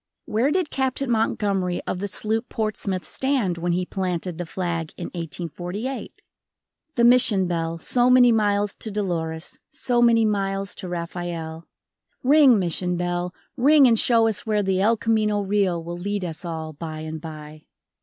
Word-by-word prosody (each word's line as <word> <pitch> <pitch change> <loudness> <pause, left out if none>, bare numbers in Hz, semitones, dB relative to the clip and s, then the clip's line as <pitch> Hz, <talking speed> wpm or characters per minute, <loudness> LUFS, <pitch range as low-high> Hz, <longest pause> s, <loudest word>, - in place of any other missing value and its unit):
Where 230 +6 +1
did 355 0 0
Captain 265 -1 -1
Montgomery 200 -5 0
of 180 - -3
the 205 - -2
sloop 220 +4 -2
Portsmouth 200 -5 -2
stand 240 - -1
when 175 +1 0
he 180 +1 0
planted 180 -2 -3
the 175 - -4
flag 170 -2 -3
in 175 - -5
1848? 175 - -5 0.7
The 240 - +2
Mission 235 -5 +5
bell, 165 -1 -2
so 245 +9 +2
many 250 -1 +7
miles 205 -2 +1
to 220 - -4
Dolores, 170 -6 -3
so 240 -1 0
many 230 -1 +5
miles 195 -1 -1
to 185 - -6
Rafael. 170 -1 -5 0.6
Ring, 275 -3 +6
Mission 180 -1 -1
bell, 175 0 -2 0.2
ring 285 +3 +6
and 230 -2 +4
show 230 -2 +4
us 210 -2 +1
where 210 -2 0
the 190 -1 +1
El 225 +3 +3
Camino 215 -2 +1
Real 195 -4 0
will 170 +1 -6
lead 200 +1 -2
us 165 0 -6
all 160 -2 -5
by 155 +1 -6
and 155 0 -6
by. 155 -1 -10
195 Hz, 160 wpm, -23 LUFS, 170-225 Hz, 0.7 s, many